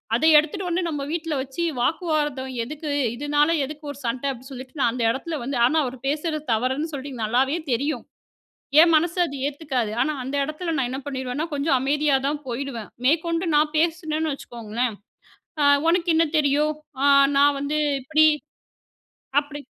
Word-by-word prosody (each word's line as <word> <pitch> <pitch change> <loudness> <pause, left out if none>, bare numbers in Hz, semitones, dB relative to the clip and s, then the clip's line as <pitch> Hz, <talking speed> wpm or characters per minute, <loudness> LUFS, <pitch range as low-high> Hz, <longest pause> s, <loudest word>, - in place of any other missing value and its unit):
அத 240 - -1
எடுத்துட்டு 315 +5 +1
வந்து 350 +2 0
நம்ம 295 -4 -3
வீட்டில் 325 -3 -2
வச்சி 270 +5 -4 0.2
வாக்குவாதம் 295 -3 -1
எதுக்கு? 300 +4 -5 0.2
இதுனால 290 +3 +2 0.2
எதுக்கு 300 +2 -9
ஒரு 285 - -11
சண்ட?" 240 +2 -2
அப்டி 260 +1 -10
சொல்லிட்டு 260 +2 -9
நான் 235 - +3
அந்த 245 -1 -2
எடத்துல 310 +6 -4
வந்து. 265 +1 -3
ஆனா, 300 +6 +2
அவரு 255 0 -6
பேசுறது 305 +1 -1
தவறுன்னு 260 +8 -1
சொல்ட்டு 280 0 -6
நல்லாவே 260 +7 +1
தெரியும். 280 +6 -1 0.8
என் 335 +1 +6
மனசு 335 +3 +1
அது 280 - -7
ஏத்துக்காது. 275 -6 -2
ஆனா, 305 - 0
அந்த 265 +2 -5
எடத்துல 320 +3 -3
நான் 265 -3 0
என்ன 265 +1 -4
பண்ணிருவேன்னா 260 +2 -3
கொஞ்சோம் 280 -1 +2
அமைதியா 290 +1 +2
தான் 295 0 -3
போயிடுவேன். 240 -3 -5 0.2
மேற்கொண்டு 335 +4 +1
நான் 300 +1 +2
பேசுனன்னு 320 -1 0
வச்சுக்கோங்களேன். 235 -2 -4 0.7
"அ - - +4 0.2
உனக்கு 345 +1 +2
என்ன 330 +1 +4
தெரியும்? 300 +1 +2 0.3
ஆ. - - +4 0.3
நான் 285 0 +5
வந்து 290 +2 -1 0.2
இப்டி 310 +4 +4 1.1
அப்டி." 290 0 -7
290 Hz, 160 wpm, -23 LUFS, 260-310 Hz, 1.1 s, என்